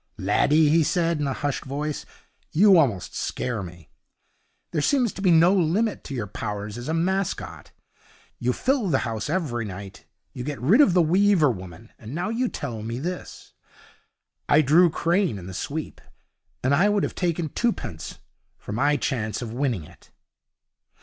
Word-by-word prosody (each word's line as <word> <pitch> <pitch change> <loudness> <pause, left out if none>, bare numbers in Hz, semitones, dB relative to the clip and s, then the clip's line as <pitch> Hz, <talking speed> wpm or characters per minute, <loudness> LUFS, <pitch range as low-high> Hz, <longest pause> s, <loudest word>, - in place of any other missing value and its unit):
'Laddie,' 145 +10 +3
he 165 +2 +4
said, 165 0 +1
in 145 - -1
a 135 - -1
hushed 145 - -1
voice, 145 +2 -4 0.4
'you 195 +3 +6
almost 115 - 0
scare 120 -5 -3
me. 85 -3 -10 0.8
There 155 - 0
seems 250 - +2
to - - -8
be 190 - +3
no 170 +2 +6
limit 195 +4 +1
to 135 - -5
your 115 -4 -2
powers 105 +1 -5
as 120 +1 -7
a 160 - -1
mascot. 190 +3 -2 0.7
You 125 +1 +1
fill 255 - 0
the 135 - +3
house 110 -2 -3
every 140 -11 -1
night, 100 0 -9 0.3
you 125 -4 -6
get 145 0 -4
rid 190 - +5
of 195 -11 +4
the 175 - +5
Weaver 180 -3 +4
woman, 95 +2 -10
and 115 +5 -8
now 175 +6 -2
you 240 +3 0
tell 120 -7 -5
me 115 +2 -4
this. 175 +7 -6 1.0
I 155 +2 +5
drew 165 +6 +5
Crane 170 - 0
in 90 - -9
the 95 - -8
sweep, 150 - -5 0.6
and 130 +2 +2
I 180 +8 +4
would 205 -1 +1
have - - -2
taken 170 -3 -1
twopence 135 - -3 0.4
for - - -9
my 145 +7 +2
chance 115 -4 -2
of 115 -1 -6
winning 125 - -1
it.' 85 +2 -17
145 Hz, 170 wpm, -24 LUFS, 115-175 Hz, 1.0 s, you